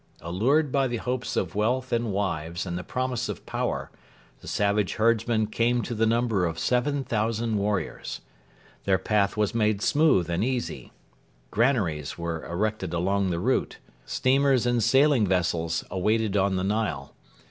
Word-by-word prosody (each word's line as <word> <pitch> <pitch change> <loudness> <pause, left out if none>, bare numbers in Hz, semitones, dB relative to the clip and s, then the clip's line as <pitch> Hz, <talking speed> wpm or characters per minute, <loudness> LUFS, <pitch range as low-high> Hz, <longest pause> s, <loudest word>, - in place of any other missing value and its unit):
Allured 125 - +1
by 135 -1 +2
the 120 -1 -2
hopes 125 +1 -3
of 90 -2 -1
wealth 125 +5 0
and 115 -2 0
wives 85 -4 -2
and 85 -2 -4
the 90 - -4
promise 130 +1 -2
of - - -6
power, - - -3 0.5
the - - -14
savage 100 -1 0
herdsmen 115 0 +2
came 115 +2 +1
to - - -4
the 115 0 +1
number 115 -5 +1
of 80 -1 -4
7,000 120 - 0
warriors. 100 -4 -2 0.6
Their 95 -1 +3
path 100 +2 0
was 105 -2 +1
made 105 -2 +1
smooth 145 - +3
and 85 +3 -1
easy. 125 0 -3 0.6
Granaries 100 - 0
were 85 -1 -4
erected 95 0 -2
along 95 +3 +1
the 85 - -1
route. 125 +10 0 0.3
Steamers 135 -1 +2
and 120 -1 +2
sailing 135 -1 +4
vessels 85 -3 0
waited 105 +2 0
on 100 -1 +2
the 90 - -1
Nile. 100 -9 -2
105 Hz, 150 wpm, -26 LUFS, 95-120 Hz, 0.6 s, sailing